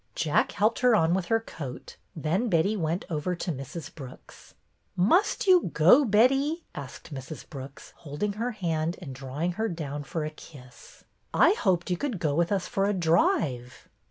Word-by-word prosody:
Jack 155 -2 +1
helped 215 +3 +1
her 250 -2 +4
on 165 -4 +3
with 185 -1 0
her 225 +5 +2
coat, 140 - -8 0.2
then 170 +9 0
Betty 185 +4 +2
went 170 -1 -2
over 170 +2 -2
to 175 +1 -3
Mrs. 140 +3 -7
Brooks. 130 -4 -13 0.4
''Must 350 - +3
you 365 -3 +5
go, 185 - +6
Betty?" 270 - +2
asked 140 +2 -9
Mrs. 135 +3 -8
Brooks, 135 -2 -10
holding 165 +7 -3
her 230 +4 -2
hand 165 -4 -2
and 150 -8 -8
drawing 135 +6 -3
her 225 - +1
down 150 -4 -5
for 155 +2 -4
a 155 - -4
kiss. 130 -5 -15 0.2
" - - -43
I - - +6
hoped 185 - 0
you 180 - +1
could 250 0 -3
go 155 -5 0
with 170 +4 +1
us 195 -3 0
for 200 -4 0
a 205 - +1
drive." 165 - 0
170 Hz, 180 wpm, -27 LUFS, 150-215 Hz, 0.4 s, go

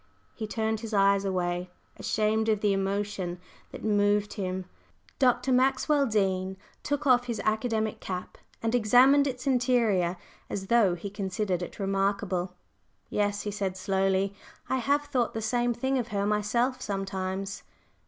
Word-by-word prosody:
He 220 - -5
turned 220 0 -1
his 220 -1 -4
eyes 200 0 +4
away, 180 -1 -1 0.3
ashamed 220 +1 0
of 215 -2 +1
the 205 -2 +3
emotion 195 -2 -2 0.3
that - - -9
moved 205 -1 +2
him. 185 -2 -3 0.5
Dr. 260 0 +3
Maxwell 270 +3 +3
Dean 190 -3 0 0.2
took 290 0 -2
off 250 -2 +4
his 235 -3 -2
academic 220 0 0
cap 180 -1 -6 0.2
and 225 +1 0
examined 250 +5 +5
its 255 0 -4
interior 235 -9 +2 0.3
as 195 - -4
though 205 -7 +5
he 195 +3 -7
considered 195 -2 -2
it 175 - -6
remarkable. 195 -2 -1 0.6
"Yes," 205 0 0
he 210 - -3
said 195 -2 -3
slowly; 195 +1 +1 0.3
"I 260 - 0
have 285 +4 +1
thought 250 -6 -1
the - - -1
same 240 +2 +1
thing 265 +3 0
of 235 - -2
her 200 -3 -1
myself 235 +5 0
sometimes." 195 -1 -3
210 Hz, 145 wpm, -28 LUFS, 195-240 Hz, 0.6 s, examined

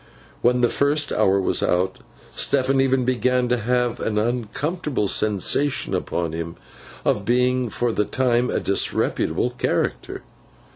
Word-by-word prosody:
When 125 +1 +2
the 120 - +3
first 145 +1 +1
hour 95 +1 +2
was 95 - +1
out, 95 +1 0 0.3
Stephen 135 +1 +1
even 130 -1 +1
began 125 0 +1
to 125 - +2
have 125 +1 0
an 105 -1 -2
uncomfortable 125 - -2
sensation 110 +8 +1
upon 85 -2 -2
him 85 +1 -5 0.5
of 105 - +1
being 125 +2 +1
for 120 +3 -1
the 105 -1 0
time 125 0 +1
a - - 0
disreputable 100 +1 0
character. 120 - -2
120 Hz, 135 wpm, -22 LUFS, 105-130 Hz, 0.5 s, the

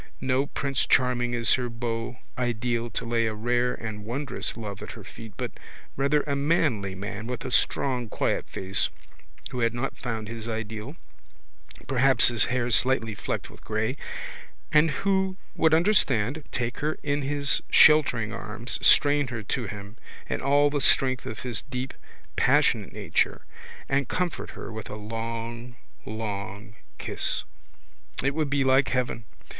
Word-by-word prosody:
No 130 +2 +1
prince 140 -2 -1
charming 120 -1 +2
is 115 -1 +3
her 125 -1 0
beau 115 0 -4 0.2
ideal 120 -1 -1
to 110 - -3
lay 115 -1 +1
a 110 - -2
rare 120 +3 +1
and 110 -2 -6
wondrous 125 +5 -3
love 105 -3 -6
at - - -7
her - - -10
feet 110 -2 -11
but - - -3 0.4
rather 140 +2 +2
a 140 -1 -1
manly 140 - +1
man 105 +3 -5
with 125 0 -4
a 130 - -3
strong 125 -2 +1
quiet - - -1
face 95 +1 +2 0.6
who 125 - -3
had 115 0 +1
not 120 +3 -2
found 110 -4 -4
his 115 0 -6
ideal, 110 +4 -4 0.9
perhaps 130 -2 +5
his 115 -3 +3
hair 125 -1 0
slightly 115 0 +2
flecked 105 - -4
with - - -16
grey, - - -1 0.8
and 155 +2 +5 0.2
who 190 -1 +2 0.2
would 160 - +3
understand, 155 - +3
take 120 -1 -2
her 155 +1 -1
in 145 0 0
his 140 -1 +2
sheltering 125 -8 +5
arms, 110 +3 -3
strain 145 -1 +5
her 120 -3 -5
to 120 +2 -2
him 100 +2 -8 0.3
in - - -2
all 145 +1 +4
the 145 -1 0
strength 130 0 +4
of 110 - -6
his 120 -6 -2
deep 130 +1 -5 0.4
passionate - - +3
nature - - 0 0.4
and 135 -2 0
comfort 180 -3 -2
her - - -7
with 110 -1 -7
a - - -5
long 115 +3 -5 0.3
long 105 0 -5 0.2
kiss. - - -1 0.8
It 140 +1 +2
would 155 -1 0
be 140 -1 +2
like 130 -1 +4
heaven. 125 -2 -1
120 Hz, 155 wpm, -26 LUFS, 115-135 Hz, 0.9 s, perhaps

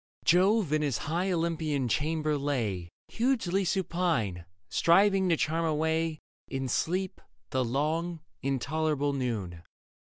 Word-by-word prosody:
Jove 185 -1 +4
in 155 - +2
his 140 -5 0
high 175 +5 -1
Olympian 160 -5 0
chamber 155 +3 0
lay 115 -12 -2 0.2
Hugely 225 -6 +1
supine, 170 - 0 0.2
striving 190 +2 +4
to 165 - +3
charm 165 +3 0
away 160 0 0 0.3
In 135 -1 -3
sleep 185 +9 -1 0.3
the 130 0 +1
long, 155 +7 -1 0.2
intolerable 145 +2 0
noon. 110 -11 -3
155 Hz, 110 wpm, -29 LUFS, 135-175 Hz, 0.3 s, Jove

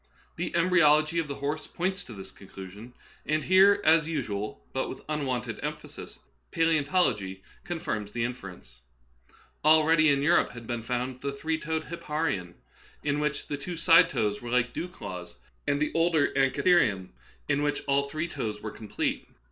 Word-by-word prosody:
The - - -3
embryology 165 -2 +4
of 165 - -2
the 140 - -4
horse 145 +3 -3
points 190 +2 -2
to 120 - -10
this 95 -2 -9
conclusion, 100 +5 -11 0.3
and 155 0 0
here, 190 +3 +6
as 160 0 +5
usual, 105 - -4
but 130 - -1
with - - -8
unwonted 130 -7 -2
emphasis, - - -7 0.3
palseontology 150 - +1 0.2
con 175 - -4
firms 105 -8 -3
the 120 +1 -2
inference. 90 - -7 0.8
Already 155 0 +5
in 140 0 +2
Europe 170 -3 +3
had 120 -1 -9
been 120 0 -3
found 125 +2 -3
the 140 - -2
three 155 +3 -2
toed 160 0 -2
hipparion, 150 - -3 0.5
in 145 0 0
which 150 -1 -1
the 145 - -4
two 170 +5 -6
side 165 +1 +6
toes 105 -8 -1
were 120 - -6
like 125 0 +1
dew 175 - -3
claws, 90 - -8 0.3
and 145 0 +2
the 150 - 0
older 165 -3 +3
an 135 0 +4
chitherium, 115 - +2 0.4
in 145 0 +1
which 145 0 -1
all 140 0 +1
three 155 +3 -2
toes 110 -10 -4
were 110 0 -6
complete. 110 - -3
140 Hz, 165 wpm, -28 LUFS, 115-160 Hz, 0.8 s, here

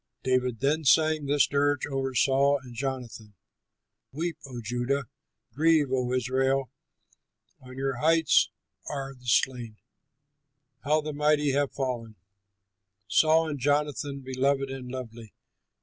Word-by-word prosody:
David 125 -2 0
then 150 +4 +1
sang 155 0 +3
this 145 0 +4
dirge 145 -1 +1
over 135 -2 -3
Saul 140 +2 +3
and 125 -2 -11
Jonathan: 120 -4 -5 0.8
"Weep, 165 +4 -3
O 125 -2 -7
Judah! 120 +5 -1 0.5
Grieve, 155 0 +3
O 125 -1 0
Israel! 130 +1 0 0.9
On 130 0 -12
your 135 -1 -2
heights 160 +2 +3 0.4
are 135 -2 -5
the 125 -1 -16
slain! 120 -2 +1 1.1
How 155 +2 +2
the 150 0 -5
mighty 150 0 +2
have 140 0 0
fallen! 120 -5 -4 0.9
"Saul 160 +9 +4
and 145 -2 -4
Jonathan, 145 0 -1
beloved 135 +1 0
and 130 -2 -7
lovely! 115 -4 -8
135 Hz, 120 wpm, -27 LUFS, 125-145 Hz, 1.1 s, this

